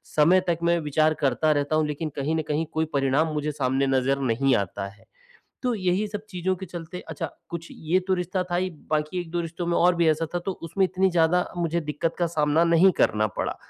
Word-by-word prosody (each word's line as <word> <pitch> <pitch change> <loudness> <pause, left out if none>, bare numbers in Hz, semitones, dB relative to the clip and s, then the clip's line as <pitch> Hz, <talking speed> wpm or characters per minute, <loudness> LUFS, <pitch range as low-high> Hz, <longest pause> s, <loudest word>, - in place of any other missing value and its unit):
समय 170 +5 +5
तक 170 - +1
मैं 170 0 +3
विचार 155 +2 +3
करता 140 +4 +2
रहता 145 +1 +1
हूँ 155 -1 +2
लेकिन 150 +2 -3
कहीं 145 +3 -1
न 160 - +1
कहीं 150 +2 0
कोई 160 0 +1
परिणाम 140 +3 +1
मुझे 150 0 -1
सामने 135 -1 0
नज़र 135 +1 +1
नहीं 135 +2 +2
आता 100 0 -2
है। 100 +2 -16 0.6
तो 250 - +1
यही 185 +1 0
सब 210 0 -6
चीज़ों 185 -1 -1
के 190 - -7
चलते 175 +1 -7
अच्छा, 160 - -4 0.2
कुछ 170 -1 -6
ये 165 +4 0
तो 190 - +2
रिश्ता 180 +1 -1
था 175 - +1
ही 185 +1 0 0.2
बाकी 155 +3 0
1-2 175 0 -3
रिश्तों 170 +1 -5
में 170 - +1
और 180 +1 +4
भी 170 -1 +3
ऐसा 160 +1 +1
था - - +2
तो 195 - 0
उसमें 190 +4 0
इतनी 185 +1 +1
ज़्यादा 175 +1 +3
मुझे 170 0 0
दिक्कत 150 +2 -2
का 175 - +2
सामना 155 0 +2
नहीं 170 +3 +5
करना 110 0 +3
पड़ा। - - -2
160 Hz, 225 wpm, -25 LUFS, 150-175 Hz, 0.6 s, समय